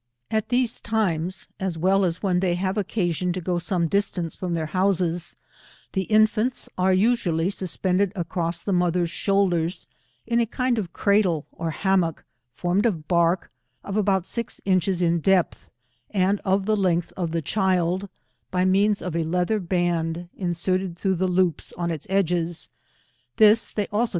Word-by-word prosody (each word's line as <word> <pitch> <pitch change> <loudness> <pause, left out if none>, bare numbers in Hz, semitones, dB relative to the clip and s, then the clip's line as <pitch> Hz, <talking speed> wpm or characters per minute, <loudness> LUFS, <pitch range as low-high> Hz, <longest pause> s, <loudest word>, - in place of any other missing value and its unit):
At 220 -1 0
these 245 -1 +1
times, 185 -5 -1
as 190 -3 -2
well 190 +4 +3
as 175 0 -1
when 185 -3 +2
they 180 -2 +1
have 185 +2 -1
oeca 200 -2 0
gioQ 180 +3 -1
to - - -2
go 175 0 -1
some 170 -1 0
distance 180 -3 -1
from 180 -2 -3
their 160 -1 -1
houses, 175 0 0 0.6
the 190 -1 0
infants 220 +3 +2
are 185 +1 +2
usually 185 -4 +2
suspended 185 0 0
across 170 -1 -2
the 200 - -1
mother's 175 -1 +1
shoulders, 185 -3 +1 0.4
in 235 +1 +1
a 230 - +2
kind 250 +1 0
of 180 -5 -4
cradle 190 -6 +2
or 165 0 -4
hammock, 180 -1 0 0.3
formed 175 - 0
K 235 - +3
'Z 205 - -2
lOi - - -7
of 150 - -25
bark, 170 0 +2 0.3
of 200 - -5
aboat 195 -3 +2
six 235 +3 -4
inches 185 -1 +1
in 170 0 +2
depth, 185 +1 +1 0.4
and 195 +1 +1
of 190 0 +1
the 215 +1 +2
length 175 -4 0
of 175 -3 -2
the 165 0 -2
child, 185 +1 0 0.4
by 180 0 +1
means 200 +2 +2
of 180 -3 -4
a 170 - +1
leather 180 +6 0
baud 175 -2 -1
inserted 180 0 -1
through 190 +1 0
loops 180 -2 0
on 170 -1 -1
its 160 -3 -5
edges; 175 -3 0 0.6
this 215 +1 +5
they 210 - -1
also. 225 +3 +1
185 Hz, 170 wpm, -24 LUFS, 170-200 Hz, 0.6 s, this